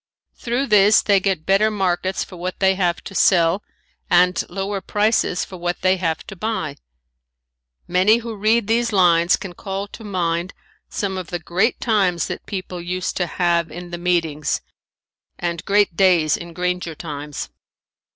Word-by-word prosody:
Through 245 +3 -2
this 210 -2 +5
they 200 -2 +4
get 190 -5 -1
better 195 +3 +3
markets 190 -2 -1
for 185 - -12
what 180 +1 -5
they 190 -1 +4
have 180 -3 -1
to - - -9
sell 175 0 +3 0.5
and 180 0 +4
lower 195 +2 -3
prices 205 -3 +1
for 185 - -10
what 175 0 -3
they 185 0 +3
have 165 -4 -2
to 195 - -9
buy. 175 -8 -3 1.1
Many 185 +5 +4
who 230 -1 -6
read 215 +2 +2
these 230 +2 +1
lines 175 -3 +4
can 190 -3 -8
call 195 +2 -5
to 225 - -11
mind 175 -2 -2 0.3
some 190 -2 -3
of 180 - -7
the 175 - -3
great 180 +7 0
times 195 -7 +1
that - - -6
people 185 -3 -5
used 180 +1 -3
to 180 - 0
have 170 -1 +1
in 175 +2 -9
the 175 - -5
meetings 165 -4 0 0.8
and 170 -1 -3
great 200 -3 +2
days 175 -5 +4
in 170 0 -8
granger 180 -1 -2
times. 150 - -6
185 Hz, 160 wpm, -21 LUFS, 170-200 Hz, 1.1 s, this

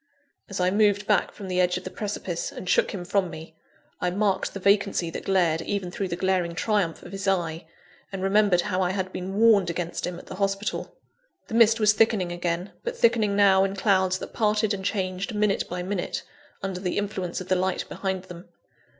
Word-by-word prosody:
As 195 - -4
I 180 0 +2
moved 205 0 +3
back 205 -3 +2
from 200 - -9
the 180 0 +1
edge 180 0 +2
of 180 - -7
the 185 - -6
precipice, 215 - -4
and - - -8
shook - - +3
him 185 -6 -5
from 190 0 +1
me, 160 0 -10 0.4
I 180 - 0
marked 195 +1 0
the - - -3
vacancy 200 -3 +2
that - - -6
glared 175 -4 +2
even 190 0 -3
through 195 +1 -3
the 170 - -3
glaring 180 -2 0
triumph 195 -3 0
of - - -10
his 195 0 -5
eye, 170 -3 -1 0.4
and 190 -1 -4
remembered 195 -2 +4
how 185 -1 -1
I 180 0 +1
had 185 -1 -3
been 185 +2 -4
warned 215 -5 +5
against 170 0 -3
him 180 -1 -5
at - - -11
the 185 - -8
hospital. 195 +1 -2 0.5
The - - -7
mist 225 0 +5
was 215 -1 +5
thickening 210 -4 +2
again, 175 +2 -2
but 480 0 -4
thickening 225 - +3
now 195 -1 +5
in 195 0 -1
clouds 190 -1 +2
that - - -8
parted 215 -1 +1
and 190 -1 -4
changed 190 +1 -2
minute 210 -1 +1
by 180 0 -3
minute, 190 -1 -3 0.4
under 190 -2 -3
the 180 -1 -2
influence 195 -4 -2
of 185 - -7
the 185 - +4
light 185 0 -1
behind 190 -2 -3
them. 180 -1 -11
190 Hz, 210 wpm, -25 LUFS, 180-205 Hz, 0.5 s, warned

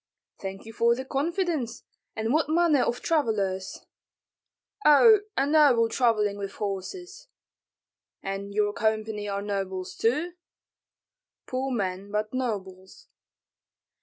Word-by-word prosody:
"Thank 195 +1 -7
you 225 - -10
for 235 +1 +3
the 260 +2 -6
confidence. 300 - -2 0.3
And 225 +2 -1
what 310 -1 +2
manner 320 -4 +3
of 240 0 -1
travellers?" 205 - -1 1.0
"Oh, 420 +9 +7 0.2
a 270 - +3
noble 280 -6 +4
travelling 215 -4 +1
with 195 0 -5
horses." 355 - -6 1.0
"And 195 +1 -4
your 205 0 +1
company 215 -1 -1
are 200 0 -3
nobles 190 -2 -4
too?" 300 +10 0 1.1
"Poor 260 +1 -3
men, 195 -4 -3
but 210 +2 -2
nobles." 190 -7 -5
225 Hz, 110 wpm, -26 LUFS, 200-280 Hz, 1.1 s, Oh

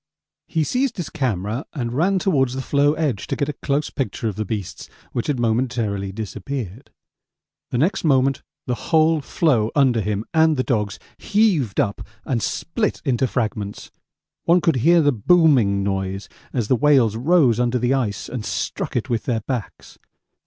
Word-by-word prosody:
He 160 - 0
seized 250 - -1
his 175 - -4
camera 110 - -2
and 120 -4 -3
ran 180 +8 +2
towards 135 -9 +1
the 135 - -2
floe 145 +2 +2
edge 150 -10 -2
to - - -2
get 145 -1 -1
a - - -2
close 145 +1 -2
picture 115 -3 -3
of 105 - -3
the 110 - -3
beasts, 100 -3 -5 0.2
which 120 - -3
had 145 -4 -1
momentarily 115 -4 -1
disappeared. 110 +3 -6 0.8
The - - -2
next 160 - +1
moment 135 -3 +2 0.2
the 125 - -1 0.2
whole 160 -1 +4
floe 130 -7 +1
under 130 -6 +3
him 105 +1 -2
and 160 -2 +4
the 130 - +1
dogs 105 -5 -1 0.2
heaved 195 - +1
up 100 -3 0 0.2
and 120 -4 -1
split 210 - -2
into 130 -1 +1
fragments. 105 -4 -3 0.5
One 170 +2 +5
could 165 -5 +1
hear 165 +6 +4
the 145 - +4
'booming' 125 - +3
noise 95 0 -3 0.2
as 120 -5 -1
the 130 - +3
whales 130 -5 +3
rose 130 -2 +3
under 125 0 +1
the 125 +2 +1
ice 120 -7 -2
and 125 -4 -5
struck 105 - -3
it 125 +1 -1
with 120 -3 -2
their 115 -3 0
backs. 120 -1 -6
125 Hz, 170 wpm, -21 LUFS, 110-150 Hz, 0.8 s, One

